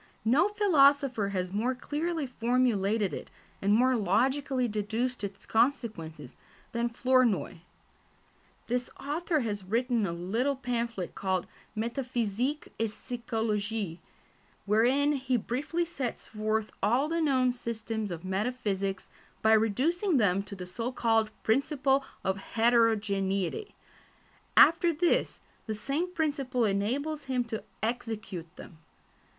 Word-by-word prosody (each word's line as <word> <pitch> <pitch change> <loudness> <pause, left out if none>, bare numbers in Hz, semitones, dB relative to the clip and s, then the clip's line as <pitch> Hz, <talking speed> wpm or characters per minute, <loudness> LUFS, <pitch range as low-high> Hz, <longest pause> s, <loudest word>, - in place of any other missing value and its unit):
No 265 - +4
philosopher 280 - +4
has 185 -2 -3
more 240 +5 0
clearly 310 +4 -2
formulated 230 -5 +1
it, - - -6 0.3
and 200 - +2
more 250 +4 +4
logically 255 +5 +1
deduced 220 +3 -2
its 200 -1 -6
consequences, 215 - -1 0.4
than 235 0 0
Flournoy. 245 -6 +2 1.1
This 245 +1 -1
author 310 +2 -1
has 205 -4 -3
written 230 +2 +1
a - - -2
little 220 +11 -1
pamphlet 235 -7 -3
called 190 -2 -1 0.3
Métaphysique 240 +2 -2
et 225 -1 +1
Psychologie, 220 -5 -3 0.7
wherein 245 +8 +3
he 260 -3 0
briefly 290 +10 -2
sets 270 -8 -4
forth 215 0 -2
all 245 +8 +2
the 335 +1 0
known 260 -5 +3
systems 225 -3 -4
of 170 0 -6
metaphysics 195 -1 -2 0.4
by 220 0 +6
reducing 280 - +2
them 200 -4 +3
to 200 0 -8
the 185 -2 -7
so 230 +7 -4
called 225 -3 +2
principle 275 +2 +2 0.2
of 190 +1 0 0.2
heterogeneity; 220 - +2 0.8
after 340 +1 +7
this, 335 +2 +1 0.3
the 220 - -2
same 285 +11 -2
principle 280 -7 0
enables 260 +10 -1
him 255 -2 0
to 225 -2 -5 0.2
"execute" 215 -7 -4
them. 160 - -12
235 Hz, 115 wpm, -29 LUFS, 205-270 Hz, 1.1 s, after